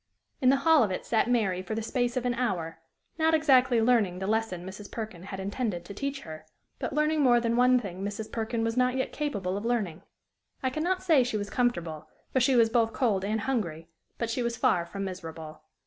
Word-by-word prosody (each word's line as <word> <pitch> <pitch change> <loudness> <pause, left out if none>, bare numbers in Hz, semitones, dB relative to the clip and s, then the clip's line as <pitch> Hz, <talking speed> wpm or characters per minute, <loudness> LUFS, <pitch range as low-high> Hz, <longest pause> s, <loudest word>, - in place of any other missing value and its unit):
In 255 - +5
the 270 - +6
hall 320 -2 +6
of 215 - +2
it 185 - -4
sat 230 +1 +1
Mary 200 -7 +1
for 185 +4 -4
the 225 - -2
space 245 +1 -1
of 250 - -1
an 245 - +1
hour, 185 -10 -2 0.4
not 320 0 +4
exactly 260 -6 +4
learning 220 -6 +3
the 190 - -4
lesson 210 -4 -1
Mrs. 190 +2 -9
Perkin 215 -6 -6
had 190 +1 -7
intended 200 -2 -3
to 200 - -8
teach 275 +6 -4
her, 155 -1 -9 0.4
but - - -3
learning 305 +1 +1
more 245 -3 +5
than 235 0 0
one 250 +1 +5
thing 195 -4 -6
Mrs. 205 +2 -5
Perkin 225 0 -2
was 225 0 -1
not 250 0 +2
yet 260 - -1
capable 200 -11 -2
of 205 - -5
learning. 215 -8 -1 0.6
I 260 - +1
can 310 - -3
not 370 +1 0
say 320 -8 +5
she 240 -3 -2
was 205 0 -5
comfortable, 170 -11 -1 0.3
for 260 - +3
she 255 +1 +3
was 230 -2 +4
both 225 -1 +2
cold 210 -7 +1
and 215 +2 -1
hungry; 170 -11 -2 0.3
but 230 -1 -2
she 250 - -1
was 235 -1 -2
far 180 -10 +2
from 195 +2 -5
miserable. 165 -4 -8
225 Hz, 225 wpm, -28 LUFS, 190-250 Hz, 0.6 s, the